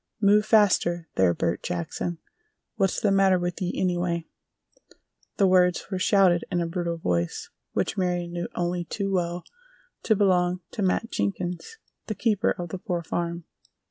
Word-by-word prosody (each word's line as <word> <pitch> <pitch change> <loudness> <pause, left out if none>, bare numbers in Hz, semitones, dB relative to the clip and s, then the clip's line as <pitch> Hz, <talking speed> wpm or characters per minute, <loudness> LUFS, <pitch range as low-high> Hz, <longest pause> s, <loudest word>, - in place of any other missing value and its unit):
"Move 210 +1 +4
faster, 180 -6 +3
there, 95 -2 +3
Bert 85 - -1
Jackson! 90 - -3 0.6
What's 195 -4 +1
the 205 - +2
matter 195 -1 +4
with 175 0 -3
ye, 180 -1 -2
anyway?" 175 -2 0 1.1
The 200 - +4
words 180 0 +3
were 190 - -1
shouted 185 -3 +4
in 175 - +1
a 170 - 0
brutal 170 0 -2
voice 85 - -2 0.2
which - - -1
Marion 175 -2 -1
knew 175 0 -3
only 175 0 -1
too 195 +2 -3
well 175 -1 -1 0.6
to 220 - +2
belong 180 -3 +2
to - - -5
Matt 195 +4 0
Jenkins, 175 - -3 0.3
the 215 - -3
keeper 220 -1 +1
of 175 -1 -3
the 185 - -5
Poor 180 -4 -3
Farm. 170 +1 -3
180 Hz, 155 wpm, -26 LUFS, 170-195 Hz, 1.1 s, Move